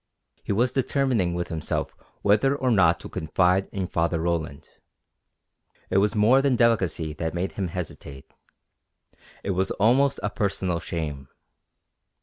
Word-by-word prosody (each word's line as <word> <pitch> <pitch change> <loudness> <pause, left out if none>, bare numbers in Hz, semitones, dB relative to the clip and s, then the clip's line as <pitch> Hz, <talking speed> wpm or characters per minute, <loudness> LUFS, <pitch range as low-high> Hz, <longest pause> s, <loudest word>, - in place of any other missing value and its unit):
He - - -4
was 120 +5 +2
determining 130 -9 0
with 85 0 -3
himself 80 -2 -3 0.3
whether 110 +7 +3
or 130 -3 0
not 85 -6 +4
to - - -8
confide 90 +4 +1
in 95 -2 -3
Father 85 -1 0
Roland. 80 -4 -3 1.2
It - - +2
was 105 +3 +1
more 115 +6 +5
than 135 -2 +2
delicacy 95 -10 +1
that 80 +2 -4
made 90 +2 -2
him 95 -2 -3
hesitate; 80 -5 -7 1.2
it 100 - -1
was 95 +1 0
almost 130 +7 +2
a - - -1
personal 95 -5 -1
shame. 75 -6 -5
95 Hz, 135 wpm, -25 LUFS, 85-115 Hz, 1.2 s, more